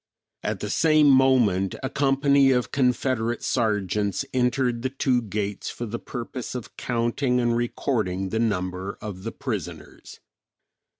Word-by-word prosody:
At - - -3
the - - -3
same 155 -3 +5
moment 120 -8 +3
a 130 - -1
company 140 0 +3
of 125 -2 +1
Confederate 125 -3 0
sergeants 105 -4 0
entered 125 -1 +1
the 130 - -1
two 130 -2 +1
gates 105 -2 -3
for 120 - -5
the 115 +1 -5
purpose 125 0 -6
of 120 -2 -7
counting 125 +2 0
and 120 -1 +1
recording 110 -6 -1
the 110 - -1
number 95 -3 -2
of 100 -4 -7
the 115 +3 -4
prisoners. 90 - -6
120 Hz, 135 wpm, -25 LUFS, 105-130 Hz, -, same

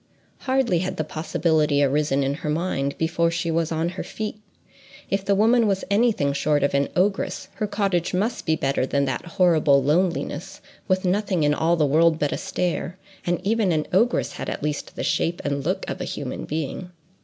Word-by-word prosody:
Hardly 260 -9 +1
had 185 +2 -3
the 155 - 0
possibility 155 -2 +1
arisen 140 0 +1
in 135 +1 0
her 150 - -3
mind, 150 -4 -1
before 165 +1 +1
she 170 0 -2
was 165 0 0
on 165 +1 0
her 185 - -5
feet: 215 0 -6 0.7
if 195 0 0
the 200 0 +2
woman 225 +3 +4
was 195 -2 0
any 230 +4 +4
thing 140 -9 0
short 145 0 +1
of 140 - +1
an 140 0 +1
ogress, 190 0 0
her 215 - -1
cottage 195 -4 0
must 205 +5 -1
be 160 - +3
better 135 -3 0
than 140 0 +1
that 130 -2 -2
horrible 155 -6 +4
loneliness, 165 +1 -1 0.3
with 185 0 +1
nothing 185 -2 +1
in 145 0 +3
all 165 +3 +2
the 155 -3 +2
world 160 +3 +4
but 145 -2 0
a - - -1
stare; 180 0 -2 0.3
and 175 +1 -1
even 215 -2 +2
an 155 -2 0
ogress 230 +6 +2
had - - -5
at - - -5
least 150 -1 -3
the - - -4
shape 170 +1 0
and 140 -1 -1
look 185 +5 -2
of - - -4
a - - -2
human 135 -3 -5
being. 160 +4 -4
170 Hz, 200 wpm, -23 LUFS, 150-190 Hz, 0.7 s, woman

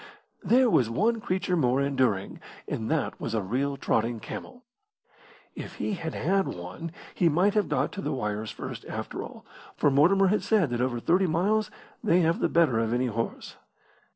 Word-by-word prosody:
There 255 +2 +4
was 125 - +3
one 220 - +1
creature 185 -1 -1
more 130 -5 +2
enduring, 130 -8 0 0.3
and 110 -1 -3
that 160 -3 -1
was 115 - -2
a 110 - +1
real 135 +8 -1
trotting 115 -2 0
camel. 250 - -8 0.9
If - - -8
he 215 - -2
had 165 -4 -4
had 195 +3 +1
one 90 - -6 0.2
he 175 - +3
might 180 +6 +3
have 210 -1 +1
got - - 0
to 200 - -6
the - - -2
wires 105 -3 -3
first - - -7
after - - -5
all, - - -10 0.3
for 145 - +3
Mortimer 185 +8 +4
had 210 - +2
said 195 - +2
that 120 0 -1
over 125 -1 0
thirty 180 +9 +2
miles 200 +7 +1 0.3
they 180 -5 +4
have 165 +5 +2
the - - +1
better 160 -9 +3
of 115 0 0
any 125 +1 +1
horse. 115 +1 -4
155 Hz, 180 wpm, -27 LUFS, 120-195 Hz, 0.9 s, There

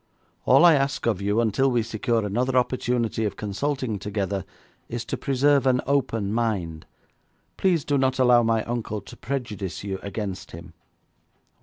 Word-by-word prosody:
All 175 - +6
I 170 - +8
ask 140 0 0
of 110 -5 0
you 105 +3 +1
until 115 +4 +2
we 120 -3 +1
secure 115 0 -1
another 125 +6 0
opportunity 125 -2 0
of 105 -2 -2
consulting 110 +2 -2
together 100 -2 -3 0.4
is 120 0 -4
to - - -3
preserve 140 +1 +2
an 125 -1 +3
open 115 -7 0
mind. 95 -9 -2 0.7
Please 175 -6 +1
do 145 -1 +1
not 130 0 +1
allow 125 -2 +5
my 115 -1 +1
uncle 115 -3 -3
to 100 - -12
prejudice 105 -9 -4
you 95 -1 -4
against 100 -1 -5
him.' 85 0 -10
115 Hz, 155 wpm, -24 LUFS, 100-130 Hz, 0.7 s, I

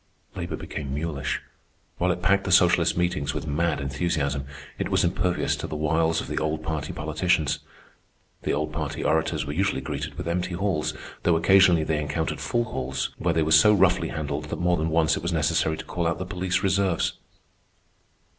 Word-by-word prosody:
Labor - - -4
became 70 -2 -5
mulish. 75 -2 -2 0.6
While 90 +1 +2
it 90 0 -4
packed 100 0 +3
the 95 - -1
socialist 90 -2 +4
meetings 90 -6 0
with - - -3
mad 80 +2 0
enthusiasm, 70 0 -1 0.3
it - - -1
was - - +2
impervious 90 0 0
to - - -5
the - - -5
wiles 80 +2 +1
of - - -7
the - - -2
old 80 0 -2
party 80 -2 -3
politicians. 80 0 0 0.8
The - - -1
old 75 +1 -1
party 75 -2 -3
orators 80 0 +1
were 70 - -4
usually 95 -2 0
greeted 75 +3 -5
with - - -5
empty 90 +1 -1
halls, 90 -4 -1 0.3
though 85 - +3
occasionally 90 -1 +5
they 75 -1 0
encountered 75 +2 -2
full 120 0 0
halls 65 - -3
where 85 -2 0
they 80 - +3
were 80 - -1
so 105 +5 +7
roughly 95 -1 +3
handled 75 -1 -3
that 75 - -4
more 90 0 +2
than 80 -1 -1
once 80 0 +3
it - - -4
was 85 +2 -2
necessary 80 0 +1
to - - -7
call 85 -1 -2
out 85 - 0
the 95 - -4
police 90 -1 -1
reserves. 95 -2 +1
80 Hz, 190 wpm, -25 LUFS, 75-90 Hz, 0.8 s, so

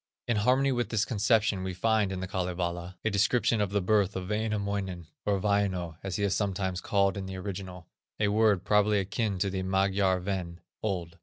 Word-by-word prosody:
In 120 - +1
harmony 130 +6 +3
with 120 -2 -1
this 110 -1 +1
conception 110 -3 +2
we 95 0 -4
find 110 +1 +2
in 95 -1 -4
the 95 - -3
Kalevala, 90 -1 -3
a 110 - +2
description 115 +2 +2
of 100 - +1
the 100 -1 0
birth 100 -1 +2
of 95 0 -4
Wainamoinen, 100 -4 -2 0.2
or 100 -1 +2
Vaino, 95 -5 0
as 95 -1 -4
he 105 - -1
is 100 -1 +2
sometimes 95 -2 -1
called 100 -2 +1
in 95 -1 -4
the 95 0 -6
original, 95 -2 -6 0.3
a 105 -1 +2
word 105 -3 +3
probably 105 0 +3
akin 100 +1 -1
to 95 +1 0
the 95 0 -2
Magyar 95 0 +2
Ven, 90 -2 -4 0.2
old. 85 -5 -3
100 Hz, 190 wpm, -29 LUFS, 95-105 Hz, 0.3 s, harmony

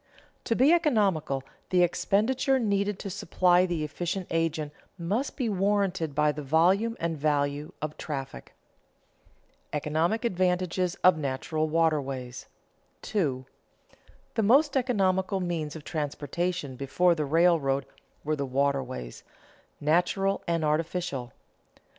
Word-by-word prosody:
To 230 - +1
be 270 +8 +5
economical, 200 - +1 0.3
the 180 -1 +4
expenditure 235 +9 +1
needed 200 -4 0
to 200 - -6
supply 180 -1 +3
the 170 -3 -2
efficient 175 +5 -3
agent 160 -2 -1 0.2
must 200 +11 -2
be 255 -5 0
warranted 195 -6 0
by 150 0 +3
the 150 +1 -6
volume 180 - +2
and 165 -1 -1
value 145 0 0
of 155 0 -4
traffic. 135 - -6 0.9
[Sidenote: - - -39
Economic 160 - 0
advantages 180 -2 0
of 180 -3 +6
natural 155 +3 -2
waterways] 140 -6 -1 0.6
2. 140 -11 -1 0.9
_The 225 - 0
most 275 +7 +4
economical 195 -6 +1
means 165 -4 -3
of 155 - -8
transportation 150 0 -3
before 140 +7 +2
the 155 -2 -2
railroad 145 -4 +2 0.4
were 155 +1 0
the 140 - -3
waterways, 130 - -2 0.6
natural 180 +6 +1
and 165 -2 0
artificial. 155 -4 -2
170 Hz, 115 wpm, -27 LUFS, 150-195 Hz, 0.9 s, of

